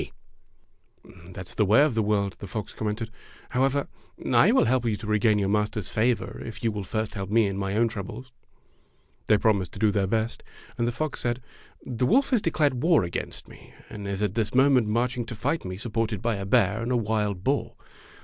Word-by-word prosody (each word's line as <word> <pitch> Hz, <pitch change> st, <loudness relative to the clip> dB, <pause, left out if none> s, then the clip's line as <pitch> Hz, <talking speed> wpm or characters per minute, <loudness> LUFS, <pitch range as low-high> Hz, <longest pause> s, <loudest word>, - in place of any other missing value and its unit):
73 -, -, -8 dB
Fairy -, -, -39 dB
Tale -, -, -16 dB
Foxes 90 Hz, +2 st, -13 dB
"That's 95 Hz, -2 st, -6 dB
the 105 Hz, -, +2 dB
way 110 Hz, +7 st, +5 dB
of 150 Hz, -4 st, +2 dB
the 110 Hz, -, +1 dB
world," 100 Hz, -2 st, 0 dB
the 100 Hz, -, -7 dB
fox 105 Hz, +2 st, -5 dB
commented. 110 Hz, +1 st, -3 dB, 0.4 s
"However, 135 Hz, +2 st, +1 dB, 0.5 s
I -, -, +6 dB
will -, -, +4 dB
help 125 Hz, +1 st, +1 dB
you 110 Hz, -, +1 dB
to 105 Hz, -, -9 dB
regain 105 Hz, 0 st, +3 dB
your 100 Hz, -1 st, +1 dB
master's 105 Hz, -1 st, -1 dB
favor 115 Hz, +2 st, 0 dB
if 115 Hz, -, -8 dB
you 115 Hz, -, +2 dB
will 105 Hz, -1 st, -4 dB
first 110 Hz, +3 st, -3 dB
help 95 Hz, -2 st, -5 dB
me 110 Hz, +1 st, +4 dB
in 100 Hz, -1 st, -2 dB
my 100 Hz, 0 st, -2 dB
own 115 Hz, +2 st, +3 dB
troubles." 115 Hz, +4 st, -7 dB, 1.0 s
They 105 Hz, -, +5 dB
promised 100 Hz, -4 st, +1 dB
to -, -, -8 dB
do 110 Hz, -2 st, +3 dB
their 100 Hz, -2 st, +1 dB
best, 110 Hz, +2 st, -1 dB, 0.3 s
and 120 Hz, -, 0 dB
the -, -, +1 dB
fox 155 Hz, +3 st, -3 dB
said: 120 Hz, 0 st, -1 dB, 0.5 s
"The 125 Hz, 0 st, -1 dB
wolf 270 Hz, +6 st, +3 dB
has 245 Hz, -5 st, +3 dB
declared 145 Hz, -7 st, +1 dB
war 165 Hz, -, +4 dB
against 85 Hz, -1 st, -5 dB
me, -, -, -16 dB, 0.2 s
and 105 Hz, -2 st, -6 dB
is 100 Hz, +1 st, -2 dB
at 100 Hz, -2 st, 0 dB
this 110 Hz, 0 st, -1 dB
moment 130 Hz, -3 st, +5 dB
marching 120 Hz, +3 st, 0 dB
to 115 Hz, -, -5 dB
fight 145 Hz, +7 st, -1 dB
me 90 Hz, 0 st, -5 dB
supported 110 Hz, -1 st, -2 dB
by 115 Hz, -1 st, -1 dB
a 100 Hz, 0 st, -5 dB
bear 110 Hz, -1 st, +3 dB
and 120 Hz, +2 st, -2 dB
a 125 Hz, -, +3 dB
wild 105 Hz, -4 st, -1 dB
boar. 140 Hz, +4 st, 0 dB
110 Hz, 220 wpm, -26 LUFS, 100-120 Hz, 1.0 s, I